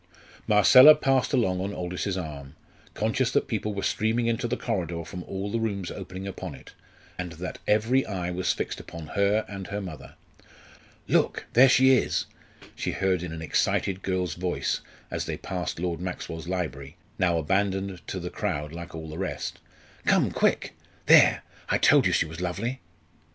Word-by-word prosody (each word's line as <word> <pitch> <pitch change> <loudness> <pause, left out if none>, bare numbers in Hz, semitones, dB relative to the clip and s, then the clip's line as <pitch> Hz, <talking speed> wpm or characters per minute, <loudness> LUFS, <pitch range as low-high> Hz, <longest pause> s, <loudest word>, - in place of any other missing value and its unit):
Marcella 125 +9 +8
passed 135 -1 +1
along 95 -9 +1
on 100 +2 -3
Aldous's 90 +2 -3
arm, 75 -4 -7 0.4
conscious 115 +4 +1
that - - +1
people 105 -2 -2
were 100 - -3
streaming 115 +2 +1
into 115 +1 0
the 120 - -2
corridor 85 -7 -3
from 90 +1 -7
all 100 +1 -4
the 115 - 0
rooms 100 -5 -2
opening 95 0 -7
upon 95 - -6
it, - - -15 0.5
and 90 -2 -4
that 90 +3 -6
every 115 +5 +3
eye 90 -4 -3
was 90 +1 0
fixed - - -3
upon 85 -3 -9
her 100 +2 +2
and 100 -2 -7
her 100 - -3
mother. 90 -6 -9 0.9
"Look, - - +1
there 130 +3 +7
she 130 +1 +6
is," 130 - +2 0.5
she - - -3
heard 95 -2 +1
in 90 -2 -5
an 80 0 -6
excited 95 +4 0
girl's 90 -4 -1
voice 90 0 -2 0.3
as - - -2
they - - -4
passed 90 -3 -4
Lord 85 -1 -2
Maxwell's 85 -2 -5
library, 80 -5 -4 0.2
now 90 -3 +2
abandoned 95 +2 0
to 95 - -4
the 90 0 -5
crowd 75 -7 -3
like 85 0 -8
all 80 0 -6
the 80 +2 -7
rest. 95 - -4 0.5
"Come, - - +3
quick! - - +1 0.3
There - - +6 0.3
I - - +3
told - - +5
you - - +1
she - - +2
was 80 +2 -8
lovely!" 105 +9 -3
95 Hz, 170 wpm, -26 LUFS, 85-105 Hz, 0.9 s, Marcella